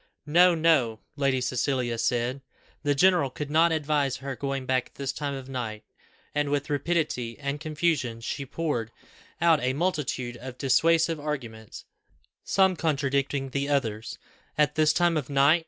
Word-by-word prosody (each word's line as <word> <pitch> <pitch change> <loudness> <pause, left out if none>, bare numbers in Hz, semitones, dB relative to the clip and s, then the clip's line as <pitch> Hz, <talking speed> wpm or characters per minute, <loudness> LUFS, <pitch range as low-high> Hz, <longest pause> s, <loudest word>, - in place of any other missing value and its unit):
"No 175 +3 +5
no," 150 -9 +2 0.2
Lady 135 -2 +1
Cecilia 125 -2 -1
said. 125 +3 0 0.4
The 145 -1 +1
general 175 -2 +4
could 145 +3 -6
not 165 +2 +4
advise 150 -3 +1
her 135 0 -5
going 135 +2 -3
back 130 -1 0
at - - -30
this 135 -1 -2
time 145 -2 -3
of 135 -1 -8
night. 120 -5 -5 0.5
And 145 -1 0
with 145 +1 -1
rapidity 145 -6 -1
and 145 0 -3
confusion, 155 -6 -1
she 140 +4 -4
poured 135 -5 -2 0.5
out 165 -2 +4
a 130 +1 +1
multitude 140 -7 -2
of 130 0 -9
dissuasive 165 +4 +3
arguments, 120 -8 -6 0.6
some 190 -1 +3
contradicting 140 -3 0
the 140 +1 -1
others. 115 -7 -1 0.4
"At 150 -1 +3
this 155 0 +4
time 170 0 +2
of 145 -3 -3
night! 140 +4 +5
140 Hz, 155 wpm, -27 LUFS, 130-155 Hz, 0.6 s, No